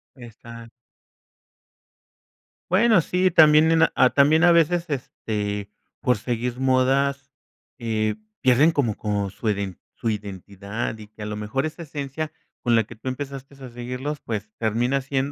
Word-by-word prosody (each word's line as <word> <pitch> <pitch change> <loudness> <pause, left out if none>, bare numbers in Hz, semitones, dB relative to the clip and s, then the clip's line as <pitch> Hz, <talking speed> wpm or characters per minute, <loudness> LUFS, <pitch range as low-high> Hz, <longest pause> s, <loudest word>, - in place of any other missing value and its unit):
Exac 115 -1 -12 2.0
Bueno, 205 -1 +5
sí, 185 +4 +1
también 155 -1 +6
en, 165 0 +5
ah, 130 - +5
también 150 +4 +5
a 175 - +7
veces, 170 +1 +3
este, 105 -6 -3 0.3
por 125 -3 +2
seguir 120 +2 -3
modas, 135 +2 +1 0.5
eh, 110 -3 -1 0.3
pierden 130 +6 +5
como 125 -9 0
con 100 -2 -1
su 110 +2 -3
iden 100 -3 -3 0.2
su 115 - -2
identidad 100 +2 -5
y 105 -1 -11
que 110 +1 -15
a - - -4
lo 105 0 -4
mejor 110 +7 -2
esa 155 +2 -6
esencia 145 +1 -5 0.3
con 120 -2 +2
la 115 - +4
que 115 +2 -12
tú 110 - -11
empezaste 135 +1 -7
a 130 - -7
seguirlos 125 +5 -5
pues, 110 -2 -4
termina 120 +5 0
siendo, 135 +1 -2
125 Hz, 150 wpm, -23 LUFS, 110-145 Hz, 2.0 s, a